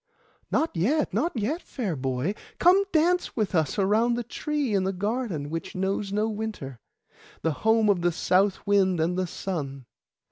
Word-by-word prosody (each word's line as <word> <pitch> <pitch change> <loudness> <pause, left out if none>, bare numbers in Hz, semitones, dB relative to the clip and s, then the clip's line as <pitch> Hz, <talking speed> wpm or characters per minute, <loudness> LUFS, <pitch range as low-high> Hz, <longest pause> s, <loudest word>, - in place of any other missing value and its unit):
'Not 320 -7 0
yet, 270 - +1
not 335 -5 0
yet, 270 - -1
fair 210 - -3
boy; 130 +6 -1 0.2
come 375 +3 +5
dance 350 +3 +2
with 215 -4 -1
us 160 +1 +1
around 215 +5 +3
the 240 - -2
tree 290 -1 -2
in 195 -2 +2
the 190 +1 -1
garden 200 - -2
which 165 0 -5
knows 195 +1 -1
no 210 +2 +1
winter, 210 - -5 0.6
the 160 - +2
home 220 0 +4
of 195 -4 +3
the 175 0 +2
south 185 +4 +1
wind 195 -3 +3
and 165 +3 +1
the 185 0 -1
sun. 140 -8 -5
200 Hz, 170 wpm, -26 LUFS, 175-235 Hz, 0.6 s, come